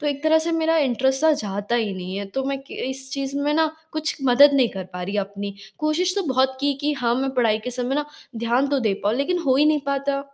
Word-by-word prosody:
तो 300 - -3
एक 285 -1 -2
तरह 315 0 +5
से 335 - 0
मेरा 325 0 +2
इंटरेस्ट 265 +1 +1
ना 315 - +6
जाता 205 +3 -3
ही 220 -4 0
नहीं 185 +1 -6
है। 200 - -4
तो 270 - -1
मैं 275 0 -2
क - - -8 0.2
इस 265 0 -3
चीज़ 275 0 -3
में 290 +1 0
ना 320 -1 +2 0.2
कुछ 310 0 -2
मदद 265 +3 +7
नहीं 255 -4 +4
कर 190 -1 -6
पा 180 - -5
रही 200 +3 -3
अपनी। 200 0 -6 0.2
कोशिश 340 +4 +1
तो 400 - +1
बहुत 260 0 +2
की 285 0 +2
कि 295 +1 0
हाँ, 245 -4 0
मैं 270 +2 -1
पढ़ाई 225 -4 +2
के 250 - -3
समय 250 +1 -2
ना 295 +1 0 0.3
ध्यान 235 +4 +1
तो 280 - +1
दे 215 -4 +1
पाऊँ। 210 - +2
लेकिन 355 +6 0
हो 260 -1 +4
ही 295 - +4
नहीं 305 -1 +3
पाता। 275 0 -1
270 Hz, 260 wpm, -23 LUFS, 235-295 Hz, 0.3 s, मदद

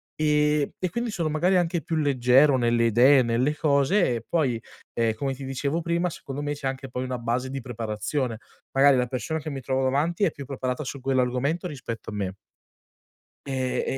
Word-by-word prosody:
ehm, 150 -1 +2
e 185 - -1
quindi 235 0 -2
sono 170 -6 -1
magari 175 +5 +2
anche 175 -1 0
più 165 - -3
leggero 135 -1 +4
nelle 120 -1 +2
idee 125 +5 +6
e - - +4
nelle 125 +5 +1
cose 145 +1 +2
e 115 -1 -6
poi, 135 -9 0 0.3
ehm, 115 -1 +1
come 135 +2 -2
ti 135 - -9
dicevo 140 +5 -2
prima, 170 +1 0
secondo 140 -2 -6
me 145 0 -1
c'è 145 -2 -4
anche 135 0 -4
poi 125 +1 -3
una 130 -1 -3
base 120 +2 -1
di 135 0 -4
preparazione, 115 +1 -3 0.4
magari 135 0 +5
la 125 0 +1
persona 135 +6 -3
che 155 - -6
mi 135 -1 -5
trovo 130 +1 -1
davanti 150 +8 +1
è 170 - +1
più 140 - -9
preparata 130 +1 -3
su 140 0 -6
quell'argomento 130 +5 0
rispetto 120 -8 -6
a - - -8
me 95 -2 -3 1.1
e 130 -2 -1
135 Hz, 195 wpm, -25 LUFS, 125-150 Hz, 1.1 s, idee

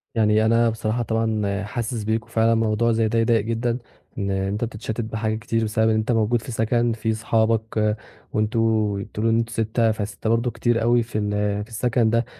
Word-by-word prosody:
يعني 110 0 +3
أنا 115 +1 +4
بصراحة 110 +1 -2
طبعًا 110 -3 -1
حاسس 115 +1 -3
بيك، 110 +1 -1
وفعلًا 115 0 +2
الموضوع 115 +1 +2
زي 110 -1 +2
ده 115 +1 +1
يضايق 115 -1 +3
جدًا 115 +1 -1 0.4
إن 100 -2 -1
أنت 95 +3 -1
بتتشتت 110 0 -4
بحاجات 110 0 -2
كتير 115 0 -1
بسبب 110 +1 +1
إن 110 - +2
أنت 110 +2 0
موجود 115 +1 +2
في 125 - -8
سكن 115 +1 +1
في 110 0 -1
أصحابك، 110 -1 +1 0.4
وأنتم 110 -2 +1
بتقولوا 115 +2 -1
إنه 115 - +3
أنتم 115 0 -3
6 110 +1 +1
ف6 110 +1 -4
برضه 115 +1 +1
كتير 115 +1 0
أوي 120 0 +3
في 115 -1 -5
ال 105 -1 -1 0.3
في 115 - -14
السكن 115 0 +1
ده 115 +1 +1
110 Hz, 190 wpm, -23 LUFS, 110-115 Hz, 0.4 s, أنا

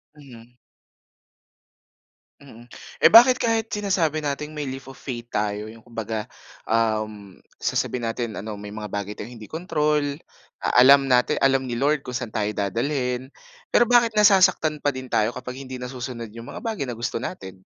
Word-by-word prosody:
Mhm. 125 -4 -15 1.9
Mhm. 120 -4 -14 0.3
Eh - - +7
bakit 245 +3 +8
kahit 225 -1 0
sinasabi 185 -7 0
natin 150 0 -3
may 150 -2 -5
leap 135 0 -7
of 135 - -16
faith 120 -3 -7
tayo, 105 +1 -2
'yong 115 - -14
kumbaga 110 -2 -4 0.4
uhm, 110 -3 -1 0.2
sasabihin 125 -2 -2
natin 115 -2 -4
ano 105 0 -6
may 105 0 -8
mga 105 -2 -6
bagay 100 0 -4
tayong 115 +2 -9
hindi 110 - -10
kontrol, 150 -3 -1 0.4
a - - -2 0.2
alam 135 +1 +7
natin, 125 -1 +3
alam 135 -1 +3
ni 120 -2 -4
Lord 145 +1 +1
kung - - -7
saan 120 -3 -5
tayo 105 -1 0
dadalhin. 125 +5 -2 0.4
Pero 240 - +4
bakit 240 -2 +4
nasasaktan 185 -7 +4
pa 145 - +2
din 130 -1 -7
tayo 110 -1 +1
kapag 125 +1 -7
hindi 130 -1 -7
nasusunod 125 -2 -6
'yong 115 +2 -10
mga - - -7
bagay 225 - -3
na 125 -3 -4
gusto 120 0 -3
natin? 95 - -7
125 Hz, 165 wpm, -24 LUFS, 110-150 Hz, 1.9 s, bakit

